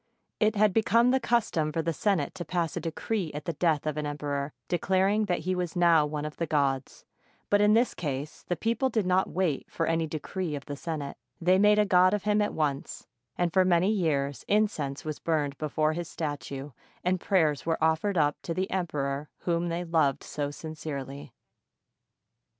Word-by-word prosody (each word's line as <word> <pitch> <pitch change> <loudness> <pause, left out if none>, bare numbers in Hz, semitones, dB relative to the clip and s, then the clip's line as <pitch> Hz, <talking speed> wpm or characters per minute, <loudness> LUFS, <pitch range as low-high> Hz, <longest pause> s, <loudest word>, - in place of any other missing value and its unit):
It 220 0 +3
had 210 -1 +4
become 230 +3 +4
the 265 - +3
custom 220 -11 +1
for 160 +1 -1
the 165 +1 0
Senate 190 -5 0
to 175 - -5
pass 170 0 -2
a - - -1
decree 170 +2 -3
at 150 - -5
the 170 - -2
death 155 -2 +1
of 155 -1 -2
an 150 -1 -2
emperor, 145 -1 -3 0.2
declaring 190 +4 +2
that 180 -3 -1
he 185 - -1
was 180 -2 -3
now 170 -4 +5
one 150 0 -4
of 150 - -6
the 165 - -2
gods; 140 -3 -1 0.5
but 205 0 +5
in 210 +1 +5
this 240 +2 +3
case 145 -2 -4
the 175 - -2
people 230 - 0
did 220 -5 0
not 185 +1 +2
wait 175 -6 -1
for 165 - -1
any 165 0 0
decree 160 +2 -4
of 140 - -7
the 145 - -5
Senate, 145 -2 -5
— - - -47
they 185 +2 +4
made 210 +1 +5
a 210 - +4
god 185 0 +5
of 205 - -4
him 210 0 +2
at 210 - 0
once; 145 -3 -2 0.3
and 175 -2 0
for 190 - +5
many 180 +2 +3
years 145 - 0
incense 180 -11 0
was 155 -1 -4
burned 150 -4 0
before 155 0 0
his 170 0 -4
statue, 145 -2 -5 0.3
and 180 0 +1
prayers 160 -8 +2
were 165 - +2
offered 160 +5 +1
up 145 -2 +2
to 165 - -4
the 185 +1 -2
emperor 145 -5 -2
whom 170 0 0
they 170 +1 -2
loved 160 -5 +1
so 145 -1 -3
sincerely. 145 -3 -7
165 Hz, 195 wpm, -28 LUFS, 150-190 Hz, 0.5 s, now